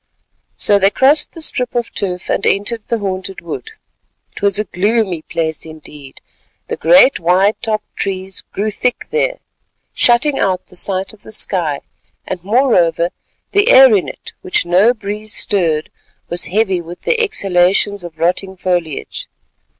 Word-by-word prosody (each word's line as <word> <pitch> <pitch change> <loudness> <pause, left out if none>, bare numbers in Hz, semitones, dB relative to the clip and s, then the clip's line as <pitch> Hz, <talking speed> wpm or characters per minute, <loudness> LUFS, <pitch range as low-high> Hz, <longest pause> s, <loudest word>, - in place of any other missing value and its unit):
So 205 -1 +3
they 195 0 +4
crossed 270 +8 +2
the 330 - -4
strip 250 -5 -1
of 240 -1 -2
turf, 180 -2 -3
and - - -1
entered 215 +3 0
the 235 - -1
haunted 190 -2 -4
wood. 170 - -7 0.6
It - - -9
was 200 -1 +3
a 210 - +1
gloomy 205 -3 -1
place 160 -1 -3
indeed; 150 -3 -12 0.5
the - - -2
great - - +5
wide 185 +5 +2
topped 215 -1 -3
trees 190 -1 -3
grew 210 +2 -2
thick 245 +4 -2
there - - 0 0.6
shutting 260 +4 +3
out 185 -2 0
the - - -18
sight 190 +2 -1
of 215 - -16
the - - -12
sky; 170 -9 0 0.6
moreover, 185 -6 +2 0.4
the 405 +3 +3
air 265 - +8
in 190 - 0
it - - -11
which 185 - 0
no 190 +8 +3
breeze 210 0 -3
stirred, 165 -6 0 0.4
was 175 0 -1
heavy 190 -2 0
with 170 +1 -11
the 470 -1 +1
exhalations 195 - +1
of 170 -2 -10
rotting 180 +3 -1
foliage. 175 -5 -3
195 Hz, 150 wpm, -16 LUFS, 175-230 Hz, 0.6 s, air